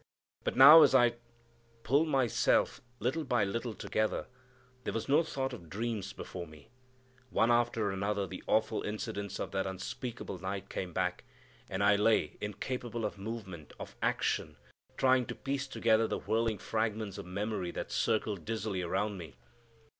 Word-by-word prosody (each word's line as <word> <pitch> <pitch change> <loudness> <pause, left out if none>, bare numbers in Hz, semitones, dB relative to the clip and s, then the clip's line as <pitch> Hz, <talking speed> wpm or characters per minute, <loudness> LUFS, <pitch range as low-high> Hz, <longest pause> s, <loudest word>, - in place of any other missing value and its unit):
But - - -1
now 150 +5 +11
as 140 -3 +6
I 120 -2 +5 0.7
pulled 140 +7 +3
myself 135 -6 +2 0.2
little 130 +9 -1
by 120 -6 +1
little 115 +3 -3
together 110 0 -1 0.6
there - - -3
was 115 0 -2
no 145 +4 +5
thought 135 -5 -3
of 85 -2 -10
dreams 105 0 -3
before 90 -2 -7
me. 75 -2 -16 0.6
One 115 0 +3
after 120 -3 +2
another 100 +1 -1
the 95 -1 -8
awful 110 0 +2
incidents 100 -1 -4
of - - -4
that 95 0 -1
unspeakable 95 +2 -5
night 95 +1 -4
came 90 -2 -4
back, - - -1 0.5
and 95 +2 -1
I 100 0 +5
lay 110 +2 +2
incapable 115 +3 -3
of - - -4
movement, 95 -7 -7
of - - -8
action, - - 0 0.4
trying 130 -2 +3
to - - -5
piece 140 0 -3
together 115 -3 +2
the - - -2
whirling 110 +1 0
fragments 110 -1 -2
of 95 - -8
memory 100 -1 -2
that - - -5
circled 105 -5 0
dizzily 110 -2 -2
around 95 +3 -1
me. 80 -7 -9
110 Hz, 155 wpm, -32 LUFS, 95-120 Hz, 0.7 s, now